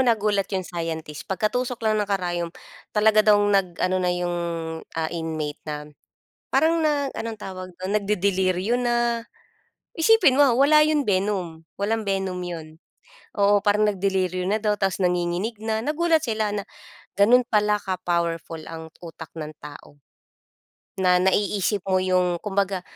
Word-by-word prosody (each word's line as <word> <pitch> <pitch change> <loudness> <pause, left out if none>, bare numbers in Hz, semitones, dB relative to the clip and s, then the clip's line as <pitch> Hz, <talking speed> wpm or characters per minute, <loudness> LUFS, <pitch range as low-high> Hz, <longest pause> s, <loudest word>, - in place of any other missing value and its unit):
nagulat 210 -5 +2
'yong 190 -2 -2
scientist. 160 -3 -5
Pagkatusok 235 +5 -1
lang 215 -1 +2
ng 205 - -2
karayom 175 -3 -1 0.5
talaga 215 0 +5
daw 210 - +7
nag-ano 185 -2 +1
na 180 - +1
'yong, 175 0 -2 0.6
ah, 160 -1 -1
inmate 160 -3 -4
nam 150 -1 -5 0.6
parang 330 +1 +2
nag 290 -3 +1
anong 225 -1 -5
tawag 185 -2 -7
dun, 185 +2 -5
nagdedeliryo 200 +1 +1
na. 240 -1 +1 0.8
Isipin 345 -4 +5
mo 285 0 +5
wala 295 +3 +6
'yong 300 -2 +2
venom, 185 -4 -1 0.2
walang 220 +2 0
venom 190 -2 -1
'yon. 165 -2 -7 0.6
Oo, 205 0 +4
parang 210 0 +3
nagdeliryo 190 -2 0
na 215 - +2
daw 210 -1 +1
ta's 195 -2 -1
nanginginig 180 +5 0
na. 220 0 -1
Nagulat 315 +2 +1
sila 215 -2 -1
na 205 -1 -4 0.5
ganun 235 +5 +6
pala 210 -1 +2
ka-powerful 170 -3 -2
ang 160 -1 -9
utak 165 -1 -9
ng 155 -2 -6
tao. 145 0 -12 1.0
Na 180 -1 +3
naiisip 200 +1 +1
mo 190 -1 +2
yung 180 -1 +1
kumbaga 195 -2 -1
195 Hz, 140 wpm, -24 LUFS, 175-215 Hz, 1.0 s, daw